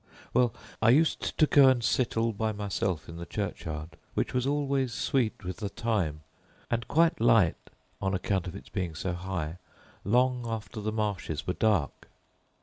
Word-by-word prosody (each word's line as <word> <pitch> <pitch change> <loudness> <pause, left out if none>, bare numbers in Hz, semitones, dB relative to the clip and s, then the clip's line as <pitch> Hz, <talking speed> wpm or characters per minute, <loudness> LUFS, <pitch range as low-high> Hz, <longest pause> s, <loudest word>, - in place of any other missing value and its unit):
"Well, 125 -2 +4 0.3
I 115 - +5
used 150 +6 +2
to 155 - +6
go 140 -2 +6
and 125 -3 +2
sit 120 -1 +1
all 115 0 +2
by 110 +1 -1
myself 100 -4 -2
in 85 - -8
the 85 - -6
churchyard, 85 -5 -4 0.2
which - - 0
was 125 +1 +1
always 140 -3 0
sweet 125 -7 0
with 90 0 -5
thyme, 100 -7 -1 0.5
and 115 -2 -1
quite 165 -4 +3
light 115 -7 +3 0.3
(on 95 -1 0
account 95 -1 -1
of 90 - -6
its - - -10
being 90 -5 -3
so 90 +2 -2
high) 90 -2 -4 0.4
long 125 +3 +2
after 110 -2 -5
the 110 +1 -1
marshes 100 -7 -2
were 90 - 0
dark. 95 -4 0
105 Hz, 165 wpm, -29 LUFS, 90-120 Hz, 0.5 s, to